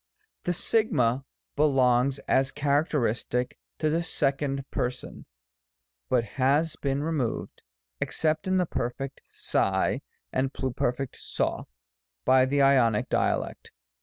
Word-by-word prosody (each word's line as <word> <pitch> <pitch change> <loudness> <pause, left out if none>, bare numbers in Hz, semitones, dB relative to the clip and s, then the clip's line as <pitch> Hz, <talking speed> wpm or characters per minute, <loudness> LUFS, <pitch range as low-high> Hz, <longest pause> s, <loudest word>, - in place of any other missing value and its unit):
1. 175 - +1 0.7
2, - - -20 0.3
belongs, 135 -2 +3
as 135 +1 +3
characteristic, 140 -4 0 0.2
to 155 - 0
the 160 +2 +1
Second 140 -4 0
Per 125 - 0
son, 125 +1 -10 0.8
but 125 -2 +3
has 140 +7 +1
been 140 0 -1
removed, 150 -8 -2 0.4
except 155 +2 0
in 190 0 +2
the 180 - +2
Perfect 135 -1 -4
aac 95 0 0 0.3
and 130 +1 0
Pluperfect 130 0 -2 0.2
oo^ - - 0 0.6
by 130 0 +5
the 140 +1 +2
Ionic 125 -6 +4
Dialect. - - -1
135 Hz, 110 wpm, -27 LUFS, 125-150 Hz, 0.8 s, by